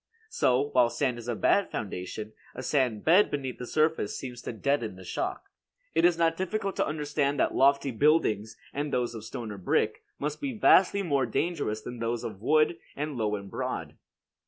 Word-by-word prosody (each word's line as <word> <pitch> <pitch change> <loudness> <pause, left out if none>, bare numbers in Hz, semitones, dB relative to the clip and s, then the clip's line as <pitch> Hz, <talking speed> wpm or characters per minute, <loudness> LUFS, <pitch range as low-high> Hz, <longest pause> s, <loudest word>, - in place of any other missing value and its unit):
So, 130 +3 +2
while 125 -2 +4
sand 125 -2 -1
is 120 - -9
a 120 - -1
bad 200 - +2
foundation, 105 +1 -5 0.2
a 130 - -6
sand 125 -8 0
bed 180 +6 +6
beneath 135 -3 -4
the 125 - -6
surface 155 -7 +1
seems 125 -2 -7
to - - -5
deaden 120 -2 -1
the 95 - -12
shock. 90 - -4 0.4
It 165 +1 +4
is 175 -1 +4
not 165 -1 +2
difficult 195 +2 -2
to - - +1
understand 145 -1 -1
that - - +2
lofty 140 0 +3
buildings, 110 -5 +2 0.2
and 145 +1 -2
those 120 -1 0
of 110 -2 -7
stone 110 0 -6
or 100 - -7
brick, 90 - 0 0.2
must 150 +1 -3
be 270 -5 -3
vastly 200 -1 +5
more 140 -7 +1
dangerous 110 -4 -1
than 120 +1 -7
those 115 0 -2
of 105 -3 -6
wood, 155 +6 +3 0.2
and 150 0 -3
low 105 -3 0
and 100 -1 -8
broad. - - -4
135 Hz, 190 wpm, -28 LUFS, 115-155 Hz, 0.4 s, bed